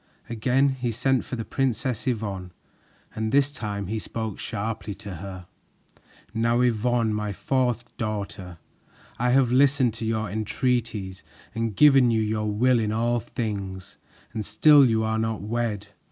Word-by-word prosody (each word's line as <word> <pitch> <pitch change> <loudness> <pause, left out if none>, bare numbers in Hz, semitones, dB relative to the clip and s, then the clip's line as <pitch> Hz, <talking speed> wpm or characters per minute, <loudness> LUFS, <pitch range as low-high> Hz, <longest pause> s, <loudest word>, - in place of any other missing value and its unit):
Again 130 +5 +2
he 125 -3 -2
sent 130 +3 +1
for - - -5
the 115 -2 -5
Princess 130 -1 -1
Yvonne, 100 -6 -2 0.6
and 110 0 -2
this 140 +2 +3
time 105 -7 -4
he 110 +4 -3
spoke 110 -1 -5
sharply 110 -1 -4
to 100 -3 -8
her. 90 0 -8 0.9
"Now, 115 +1 +2
Yvonne, 120 -1 +1
my 105 -1 -2
fourth 120 +3 -1
daughter, 100 -5 -4 0.6
I 125 +1 +2
have 125 -1 +3
listened 130 -2 +4
to 115 - -7
your 110 -1 -1
entreaties 110 -2 -2 0.3
and 115 -2 -2
given 135 -1 +6
you 110 -1 +2
your 105 0 -1
will 120 +4 +3
in 110 -2 0
all 120 +2 +1
things, 100 -5 -5 0.4
and 110 -2 -3
still 140 +8 +6
you 110 -2 +2
are 110 0 0
not 110 -1 -2
wed. 105 -2 -2
110 Hz, 150 wpm, -25 LUFS, 105-125 Hz, 0.9 s, given